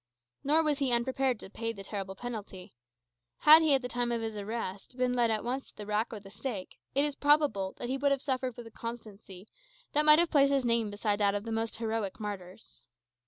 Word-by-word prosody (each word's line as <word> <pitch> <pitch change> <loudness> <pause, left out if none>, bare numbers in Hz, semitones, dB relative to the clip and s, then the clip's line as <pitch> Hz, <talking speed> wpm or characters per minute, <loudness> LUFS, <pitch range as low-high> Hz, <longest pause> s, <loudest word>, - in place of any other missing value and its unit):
Nor 310 +3 +3
was 300 -2 0
he 270 -3 +1
unprepared 255 0 +1
to - - -10
pay 230 +1 -3
the 200 -3 -9
terrible 195 -1 -5
penalty. 205 -5 -7 0.7
Had 310 +2 +9
he, 310 -3 +4
at 265 - -1
the - - -2
time 245 -1 -1
of 235 - 0
his 220 -1 -4
arrest, 205 +2 -5
been 250 0 +1
led 240 -2 +2
at 220 -1 0
once 260 +3 -3
to - - -23
the 210 - -7
rack 210 +2 -1
or 220 - -6
the 195 -1 -14
stake, 210 -4 -6 0.2
it 280 +2 +3
is 295 - -1
probable 285 -10 +2
he 255 +2 -2
would 285 +1 +3
have 275 -1 0
suffered 260 -3 -2
with 240 - -8
a 225 - -11
constancy 215 -4 -9 0.5
that 300 - +4
might 300 0 +8
have 340 0 +2
placed 280 -1 +4
his 275 -2 +1
name 230 -2 +2
beside 205 0 -1
that 200 -1 +2
of 205 - -2
the 225 - -6
most 225 0 -2
heroic 220 -3 -3
martyrs. 200 -2 -8
230 Hz, 225 wpm, -30 LUFS, 205-270 Hz, 0.7 s, Had